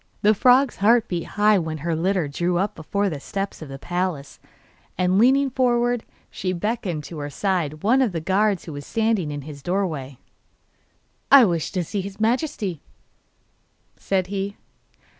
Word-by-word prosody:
The 210 +1 +6
frog's 255 +5 +4
heart 225 +3 +4
beat 175 -2 -3
high 210 -1 +5
when 160 -2 -3
her 165 +2 -2
litter 180 0 0
drew 175 +5 -1
up 195 +3 0
before 200 +6 -2
the 155 -6 -3
steps 195 +6 -5
of 155 - -8
the 135 - -7
palace, 175 -3 -3 0.6
and 185 +1 +2
leaning 270 +3 +4
forward 245 -2 +1 0.3
she 185 -1 -3
beckoned 185 -4 -2
to 160 +1 -8
her 145 0 -4
side 155 -3 -2
one 250 +6 +4
of 245 -6 +2
the 170 - -3
guards 190 +3 +1
who 160 - -7
were 145 - -6
standing 220 -1 0
in 145 -1 -5
his 145 -1 -9
doorway. 155 -7 -2 1.1
'I 275 -3 +9
wish 170 -5 -1
to 180 - 0
see 200 +4 -3
his 200 +2 -8
Majesty,' 220 - -1 1.1
said 190 -2 -1
he. 200 +1 -4
190 Hz, 165 wpm, -23 LUFS, 160-215 Hz, 1.1 s, I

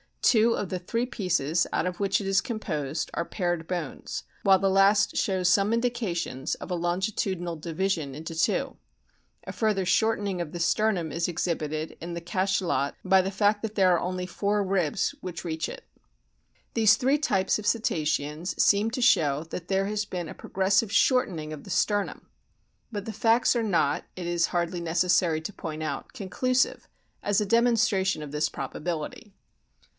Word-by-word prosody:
Two 230 0 +5
of 200 - -3
the 185 - -3
three 230 +7 -1
pieces 175 - 0
out - - +1
of 180 -1 -3
which 200 0 +1
it - - -5
is 195 0 +3
composed 160 - -3
are 170 - -2
paired 175 -4 -2
bones, 175 -6 -4 0.2
while 195 -1 +6
the 195 +1 +1
last 195 +2 +4
shows 185 -2 +1
some 200 +4 +3
indications 220 - -1
of - - -9
a - - +1
longitudinal 175 0 -1
division 160 -3 -2
into 160 +2 -6
two. 165 +1 0 0.7
A - - -5
further 210 -4 0
shortening 205 -1 +1
of 170 -3 -4
the 175 - -5
sternum 175 -1 +1
is 170 0 -1
o - - -2
exhibited 155 -2 -3
in 170 +1 -5
the 170 - -5
Cachalot 185 -5 0
by 190 0 +5
the 190 - -2
fact 205 +1 +2
that 220 -1 -4
there 190 -2 +4
are 170 - +2
only 180 0 -3
four 200 +3 0
ribs 185 -4 0
which 175 -2 -6
reach 160 -2 -2
it. - - -9 0.9
These 220 -2 +5
three 270 +3 +2
types 215 -11 +1
of 210 - -5
Cetaceans 155 -6 -1
seem 205 +2 +4
to 255 - -3
show 155 - +3
that 175 0 -6
there 195 0 +1
has 210 +1 -1
been 175 -5 -5
a - - -7
progressive 195 +3 +1
shortening 185 - +2
of 150 - -9
the - - -12
sternum. 205 +1 0 0.6
But 205 -2 -5
the 220 - -5
facts 225 +4 +3
are 235 - +1
not, 165 -8 +1
it 180 - -6
is 170 0 +1
hardly 175 0 -1
necessary 170 -1 +2
to 180 +6 -6
point 155 -3 -6
out, 155 - -4
conclusive 255 +4 0 0.3
as 205 0 +1
a - - 0
demonstration 215 -6 +2
of 145 - -8
this 150 +1 0
probability. 165 - -5
185 Hz, 175 wpm, -27 LUFS, 170-210 Hz, 0.9 s, while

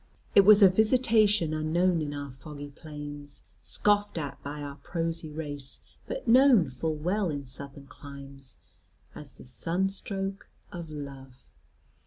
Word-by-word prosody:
It 200 - +9
was 205 +1 +8
a - - +11
visitation 215 -4 +3
unknown 165 +3 +1
in 145 -1 -3
our 145 -1 -5
foggy 145 +2 -9
plains, 145 -1 -9 0.2
scoffed 205 - +2
at 140 -3 -5
by 145 +1 -6
our 140 -1 -7
prosy 165 -1 -3
race, 145 -3 -5 0.3
but - - -5
known 240 - +6
full 155 +5 -2
well 180 +5 0
in 145 -2 -4
Southern 140 +2 -8
climes, 140 -1 -10 0.6
as 150 -2 -10
the - - -12
sunstroke 195 - -3 0.2
of 170 -2 -7
love. 135 -3 -9
155 Hz, 135 wpm, -28 LUFS, 140-195 Hz, 0.6 s, a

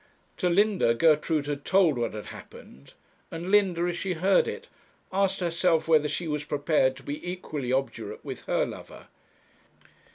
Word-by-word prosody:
To 180 - +1
Linda, 195 - +3
Gertrude 155 +1 +2
had 145 -1 -4
told 185 -6 +3
what 120 -3 -2
had 105 - -6
happened; 70 +2 -13 0.4
and 170 +3 -5
Linda, 195 -5 +3
as 175 0 -1
she 185 +1 -2
heard 185 +3 +3
it, - - -6 0.5
asked 195 0 +1
herself 170 -2 +1
whether 155 -2 +4
she 160 +4 -3
was 150 -1 -2
prepared 145 -3 +1
to - - -13
be 145 +1 -6
equally 150 -8 -5
obdurate 135 - -3
with - - -7
her - - +1
lover. - - -10
165 Hz, 160 wpm, -27 LUFS, 145-185 Hz, 0.5 s, whether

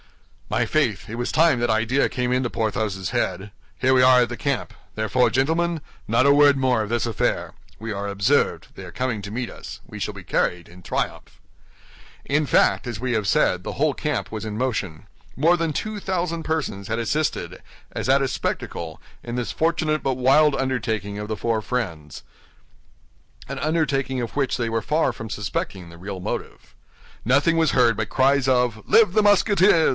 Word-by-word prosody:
"My - - +1
faith, - - 0
it 110 - -5
was 120 +1 -2
time 160 -5 +4
that 120 - +1
idea 115 +5 +2
came 125 0 -1
into 125 -1 0
Porthos's 110 -5 -2
head. 95 +2 -2 0.3
Here 130 +1 +3
we 130 - +5
are 125 -1 +6
at 120 - -3
the 120 - -4
camp; 140 +1 -2 0.2
therefore, 110 +3 +2
gentlemen, 160 +8 +1 0.3
not 115 +4 +3
a 140 - +6
word 145 -1 +5
more 130 -3 +2
of 105 - -4
this 120 +1 0
affair. 115 -3 -1 0.3
We 110 0 -4
are 100 0 -4
observed; 100 0 +1
they - - -9
are - - -9
coming 125 -5 -2
to 100 0 -7
meet 120 +1 -3
us. - - -9
We - - -9
shall - - -3
be - - -9
carried 90 -1 -1
in 90 +1 -15
triumph." - - -4 0.9
In 150 +2 +1
fact, - - +3
as 120 -4 -5
we 125 0 -1
have 105 -3 0
said, 90 -1 +2
the - - -5
whole 150 0 +1
camp 150 -3 -2
was 110 -1 -5
in 105 -1 -5
motion. 110 -10 -3 0.3
More 165 +6 +4
than 165 -2 -1
two 215 +7 -4
thousand 175 -3 -2
persons 140 -12 -3
had 115 +1 -1
assisted, 150 +7 -2 0.3
as - - -4
at 135 +1 +4
a - - +1
spectacle, 80 -9 -4 0.2
in 120 - -5
this 125 -1 -3
fortunate 160 -1 0
but 135 -1 0
wild 140 +4 +4
undertaking 110 -6 -2
of 105 +1 -6
the 110 - -2
four 115 -1 0
friends—an 85 - -9
undertaking 145 -5 0
of 120 -2 -4
which 140 -2 0
they 120 -2 -1
were 115 0 -1
far 155 +9 +1
from 115 - -8
suspecting 100 -3 -4
the 85 0 -13
real 95 +2 -6
motive. 90 - -6 0.5
Nothing 140 +7 +3
was 160 -3 +3
heard 120 -3 +4
but 105 0 -3
cries 135 0 +2
of 125 -4 +1
"Live 215 -5 +5
the 215 - +3
Musketeers! 200 -4 +4
125 Hz, 190 wpm, -23 LUFS, 110-145 Hz, 0.9 s, are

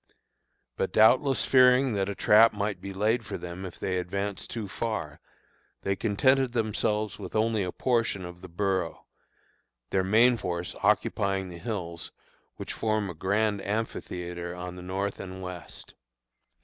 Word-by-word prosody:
But - - -1
doubtless 130 +5 +5
fearing 130 -1 +5
that 100 -1 0
a 100 - -3
trap 110 +3 +6
might 100 -2 -2
be 100 - -6
laid 110 +5 +1
for - - -5
them 90 +2 -7
if 90 - -11
they 90 -1 -1
advanced 100 +2 -3
too 115 -4 -4
far, 95 -8 -4 0.6
they 95 - 0
contented 130 +5 +2
themselves 110 -2 -1
with - - -7
only 110 0 +2
a 90 -2 -2
portion 115 -7 0
of 90 0 -10
the - - -9
borough, 95 -1 -1 0.9
their 95 - +2
main 115 +6 +5
force 90 -4 -3
occupying 95 -2 +1
the 85 -1 -9
hills 85 -4 -5 0.4
which - - -6
form 110 -3 -1
a - - -8
grand 100 +4 0
amphitheatre 90 -5 -4
on 90 0 -6
the 90 - -9
north 95 +2 -3
and 95 0 -7
west. 90 -3 -8
100 Hz, 150 wpm, -28 LUFS, 90-110 Hz, 0.9 s, trap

